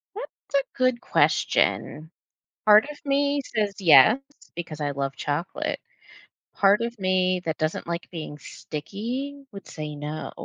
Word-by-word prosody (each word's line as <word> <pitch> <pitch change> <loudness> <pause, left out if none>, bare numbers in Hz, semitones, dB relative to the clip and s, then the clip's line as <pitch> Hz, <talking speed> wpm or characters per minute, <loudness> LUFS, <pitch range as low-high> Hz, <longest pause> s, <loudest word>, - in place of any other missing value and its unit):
That's 435 -9 -8
a 275 - -1
good 255 -2 +2
question. 155 +2 +1 0.6
Part 210 +4 +7
of 295 - -10
me 280 0 +1
says 210 -2 0
yes 165 - +7 0.4
because 165 -3 -6
I 145 -1 0
love 135 -1 -3
chocolate. 280 - -3 0.7
Part 200 +2 +4
of 235 0 -3
me 185 -1 +1
that 160 -1 -2
doesn't 155 +1 -2
like 170 0 -4
being 155 -3 -6
sticky, 245 - -6
would 200 -2 -10
say 150 -1 -6
no. 150 +2 -5
190 Hz, 140 wpm, -25 LUFS, 155-255 Hz, 0.7 s, Part